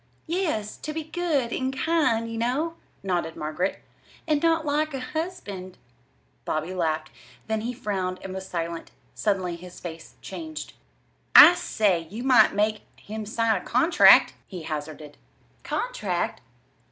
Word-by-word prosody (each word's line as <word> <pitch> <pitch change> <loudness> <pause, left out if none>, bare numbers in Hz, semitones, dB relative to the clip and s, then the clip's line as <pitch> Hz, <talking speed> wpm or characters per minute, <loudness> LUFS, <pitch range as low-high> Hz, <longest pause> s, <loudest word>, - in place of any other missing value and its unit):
"Yes; 315 - -2
to 305 - -6
be 320 0 -3
good 310 -7 -1
and 265 0 -2
kind, 295 -8 +1
you 230 - -5
know," 275 +8 0 0.3
nodded 175 -4 -1
Margaret, 155 +5 -3 0.4
"and 300 -2 +2
not 325 -1 +2
like 300 0 0
a - - -3
husband." 250 - -5 0.7
Bobby 155 +4 -2
laughed; 160 -3 -1 0.3
then 220 -1 -1
he 235 +3 -2
frowned 195 -6 -3
and 190 - -6
was 190 0 -6
silent. 170 -1 -4 0.2
Suddenly 185 -5 -1
his 180 +1 -11
face 165 -2 -9
changed. 315 -2 -7 0.6
"I 350 - +12
say, 205 - 0
you 225 +5 -6
might 250 -6 +5
make 215 +1 +1
him 215 0 -7
sign 225 0 +1
a - - -14
contract," 320 +9 +6
he 180 -4 -8
hazarded. 150 -1 -6 0.4
"Contract?" - - -2
220 Hz, 140 wpm, -25 LUFS, 180-300 Hz, 0.7 s, I